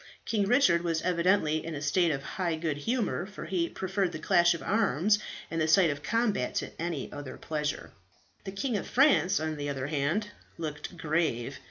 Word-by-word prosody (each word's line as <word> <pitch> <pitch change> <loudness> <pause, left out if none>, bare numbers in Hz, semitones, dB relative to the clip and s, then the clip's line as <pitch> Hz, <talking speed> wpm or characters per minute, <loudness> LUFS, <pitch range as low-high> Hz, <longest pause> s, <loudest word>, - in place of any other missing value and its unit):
King 210 -3 +1
Richard 245 -6 +4
was 165 -2 -1
evidently 170 -3 +2
in 165 -1 -5
a - - -4
state 170 +4 +3
of 140 -3 -2
high 170 +1 -2
good 160 -2 -2
humour, 215 - -1
for 205 - -8
he 170 -3 -1
preferred 190 0 -1
the - - -3
clash 175 +1 +4
of - - -8
arms 205 - +2 0.3
and 165 -1 -1
the 155 - +2
sight 165 0 +5
of 145 0 -5
combat 220 - 0
to - - -2
any 170 -5 -3
other 145 -2 -7
pleasure. 150 -2 -3 0.5
The 195 - -6
King 220 +3 -1
of - - -5
France, 250 -8 +4
on 155 -1 -3
the 145 0 -3
other 135 -2 -3
hand, 155 +8 -1 0.3
looked 160 +2 -6
grave. 150 -6 -1
170 Hz, 190 wpm, -29 LUFS, 150-195 Hz, 0.5 s, sight